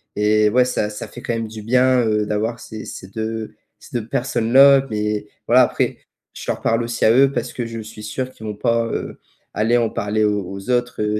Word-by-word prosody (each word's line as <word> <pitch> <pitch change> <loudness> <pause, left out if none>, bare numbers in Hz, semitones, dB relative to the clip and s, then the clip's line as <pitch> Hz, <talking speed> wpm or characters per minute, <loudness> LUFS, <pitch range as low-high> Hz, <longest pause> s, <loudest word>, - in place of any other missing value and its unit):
et 105 0 +3
ouais, 125 +4 +4
ça 125 -4 -1
ça 105 - -7
fait - - -10
quand 120 - -2
même 115 -1 -3
du 110 0 -8
bien, 125 +3 +3
heu, 105 -1 +1
d'avoir 110 +3 -2
ces 110 -1 -8
ces 95 - -8
2, 110 +1 -4 0.3
ces 120 - -5
2 110 - -9
personnes-là, 135 +3 +4
mais, 105 -1 -2 0.2
voilà, - - +6
après, - - 0 0.4
je - - -9
leur - - -2
parle 115 +1 +1
aussi 115 0 -3
à 110 - +6
eux 135 +3 +5
parce - - -2
que 120 - -4
je 115 -1 -6
suis 110 0 -10
sûr 130 +4 -4
qu'ils 110 - -12
vont 105 - -4
pas, 115 +2 +1
heu, 115 - -5 0.3
aller 110 +3 +2
en 120 -2 +2
parler 110 -1 -1
aux 105 -2 +1
aux 95 +4 -8
autres, 120 -2 0
heu, 105 0 0
110 Hz, 225 wpm, -20 LUFS, 105-120 Hz, 0.4 s, voilà